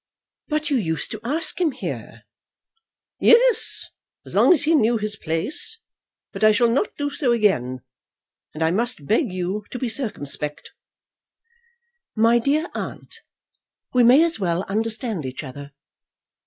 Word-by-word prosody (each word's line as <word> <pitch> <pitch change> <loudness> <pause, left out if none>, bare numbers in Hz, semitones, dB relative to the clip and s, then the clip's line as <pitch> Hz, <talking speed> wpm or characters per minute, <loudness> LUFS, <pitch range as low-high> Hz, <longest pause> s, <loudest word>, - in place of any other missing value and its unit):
"But 305 0 -2
you 275 - +3
used 160 - -2
to 220 - -5
ask 315 +8 +1
him 320 -5 +1
here." 260 - -7 1.0
"Yes, 475 -1 +4 0.4
as - - -11
long - - +5
as 310 -5 +4
he 315 +3 +2
knew 235 -6 +3
his 210 -1 -4
place. 210 - -2 0.6
But - - -5
I 215 - +7
shall 235 +2 +3
not 280 - -1
do 290 0 -2
so 280 -3 0
again. 130 - +1 0.7
And 160 - -2
I 160 - +2
must 225 - -1
beg 225 - +1
you 185 +3 -3
to - - -6
be 250 -1 -3
circumspect." 150 - -3 1.4
"My 230 +2 +4
dear 295 +7 0
aunt, - - -7 0.7
we 250 -1 +4
may 255 +7 +6
as 335 -5 +1
well 175 -1 -1
understand 220 - -2
each 130 +1 -6
other. 140 +1 -9
230 Hz, 145 wpm, -22 LUFS, 180-285 Hz, 1.4 s, I